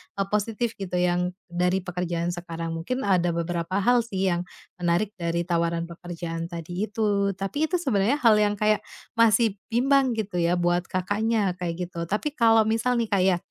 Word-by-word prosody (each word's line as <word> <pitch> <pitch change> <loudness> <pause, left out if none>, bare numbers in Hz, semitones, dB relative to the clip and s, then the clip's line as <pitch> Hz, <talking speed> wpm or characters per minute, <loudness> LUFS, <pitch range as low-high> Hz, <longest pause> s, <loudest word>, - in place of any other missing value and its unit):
e 200 - -1
positif 220 +2 -1
gitu, 185 -2 -4
yang 180 0 +1 0.2
dari 180 +2 +1
pekerjaan 175 -1 -2
sekarang. 170 -1 -5
Mungkin 175 +11 -3
ada 175 -4 +2
beberapa 170 +3 -1
hal 245 +3 +5
sih 195 -5 -1
yang 175 +1 -2 0.3
menarik 175 +4 +1
dari 170 0 -1
tawaran 170 -1 0
pekerjaan 170 -1 -6
tadi 175 +4 -4
itu, 200 -2 0
tapi 195 +12 -1
itu 360 - -1
sebenarnya 255 - +2
hal 225 -3 +6
yang 210 -1 +3
kayak 215 +1 +2 0.4
masih 225 -2 +4 0.2
bimbang, 265 +1 +3
gitu 210 -5 -3
ya, 170 0 +2
buat 175 0 +1
Kakaknya, 205 +1 0
kayak 175 0 -3
gitu. 170 -2 -4
Tapi 210 - -1
kalau 225 -2 +5
misal 225 +3 +1
nih, 230 -2 -1
Kak, 200 -3 +2
ya, 190 -2 +4
185 Hz, 175 wpm, -25 LUFS, 175-220 Hz, 0.4 s, hal